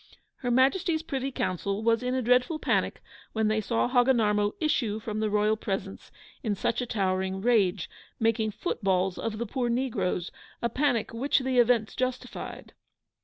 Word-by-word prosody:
Her 245 - -3
Majesty's 315 +6 +2
Privy 275 -3 -3
Council 200 -1 -2
was 230 0 +3
in 250 +1 -1
a 260 - 0
dreadful 250 +6 +3
panic - - 0 0.3
when 220 -1 +1
they 215 0 +1
saw 230 +3 0
Hogginarmo 230 -5 +3
issue 240 -9 0
from 215 -1 -4
the 215 0 0
royal 210 +1 +2
presence 195 -2 -5 0.3
in 215 -6 -1
such 230 +5 -1
a 245 - -3
towering 190 -2 -1
rage, 200 -5 +2 0.3
making 225 -1 +2
footballs 190 - -1
of 220 -1 -3
the 235 - -2
poor 245 +2 -2
negroes 215 -8 -1 0.3
a 235 - 0
panic 250 -6 0
which 260 +5 +1
the 260 -1 +1
events 235 -2 +3
justified. 255 0 -4
230 Hz, 160 wpm, -28 LUFS, 205-255 Hz, 0.3 s, was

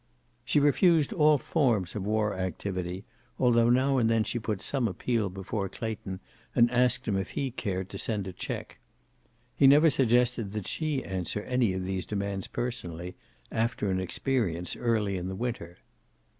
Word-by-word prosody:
She 130 +5 +2
refused 150 +1 +4
all 150 -2 +5
forms 120 - 0
of 105 - -3
war 105 -1 +1
activity, 95 0 -4 0.3
although 120 -2 +4
now 130 +2 +3
and 115 -2 +3
then 115 -1 +3
she 120 - -2
put 110 -3 -3
some 130 +1 -1
appeal 110 +2 -1
before 95 +1 -4
Clayton 105 -5 -5 0.4
and 120 0 +5
asked 125 -1 +2
him 105 - +1
if 95 +1 -2
he 135 -2 -1
cared 95 -6 -3
to 100 - -6
send 105 -4 -2
a 95 - -6
check. - - -6 0.8
He 140 - +6
never 150 +3 +7
suggested 120 -4 +2
that 105 -3 -4
she 155 -4 -1
answer 95 +2 -3
any 125 -6 +1
of 95 0 -3
these 95 0 -3
demands 100 -2 -3
personally, 90 -9 -5 0.4
after 110 -3 0
an 95 - 0
experience 95 - -1
early 110 -5 0
in 90 0 -4
the 95 - -4
winter. 100 -6 -4
110 Hz, 165 wpm, -28 LUFS, 95-125 Hz, 0.8 s, never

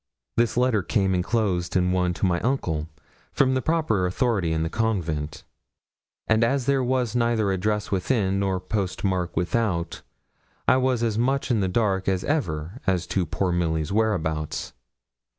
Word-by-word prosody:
This 120 0 +1
letter 125 -4 +3
came 95 -1 +1
enclosed 90 -2 0
in 90 -1 +2
one 90 -1 +1
to - - -1
my 85 -2 +2
uncle, 85 - -1 0.4
from 130 -1 +2
the 130 - +1
proper 155 - +1
authority 95 -4 0
in 80 0 0
the - - 0
convent; 80 -9 -2 0.8
and 110 0 +3
as 130 +2 +1
there 135 -1 +2
was 125 -2 0
neither 115 -4 +2
address 105 +3 -1
within, 100 0 +1
nor 95 -1 0
post 95 -1 -3
mark 90 -4 -1
without, 90 -1 -1 0.7
I - - +5
was 130 -2 +1
as 110 -2 0
much 135 +2 +1
in 115 - +2
the 95 - +1
dark 95 -1 0
as 95 -1 +1
ever 85 - -2
as 90 -2 +1
to 90 -4 +1
poor 90 +4 -1
Milly's 80 -2 0
whereabouts. 85 -8 -1
100 Hz, 160 wpm, -25 LUFS, 90-115 Hz, 0.8 s, I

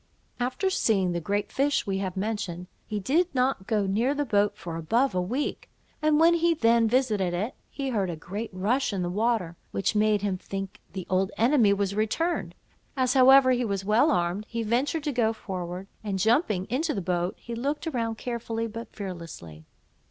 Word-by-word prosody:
After 255 +10 0
seeing 195 - +2
the 170 0 -2
great 205 +4 -2
fish 280 +1 +1
we 195 -1 -1
have 190 -1 -3
mentioned, 190 -4 -3 0.2
he 210 -1 -2
did 305 - +2
not 250 -6 +1
go 210 -3 +1
near 230 +9 +1
the 290 0 0
boat 205 -4 +1
for 165 -1 -6
above 230 - +1
a 180 - +1
week; 250 +11 -3 0.3
and 305 0 +3
when 335 +1 +6
he 340 0 +3
then 230 -4 +4
visited 215 -7 +1
it, 210 +8 -2 0.2
he 275 -2 -4
heard 200 -7 0
a 170 - -3
great 200 +8 -6
rush 215 +9 0
in 190 -2 -1
the 175 - -2
water, 210 -5 0
which 195 +1 -1
made 210 -1 +2
him 190 -3 -1
think 195 0 -6
the 185 -2 -5
old 190 +1 +1
enemy 235 -3 +4
was 200 -1 0
returned; 220 +12 -1 0.4
as 255 -1 +2
however, 265 0 +7
he 250 -1 +2
was 200 -4 -2
well 220 +9 +4
armed, 180 +3 0
he 230 -1 -2
ventured 265 +8 0
to 295 - -1
go 230 -4 +1
forward, 185 -3 -5 0.2
and 200 -3 -2
jumping 215 - +2
into 300 - -1
the 195 - -2
boat, 175 0 -1
he 235 - -8
looked 280 +7 -2
around 230 -7 -2
carefully 230 -1 -3
but 230 +1 -7
fearlessly. 165 - -8
215 Hz, 190 wpm, -27 LUFS, 190-255 Hz, 0.4 s, however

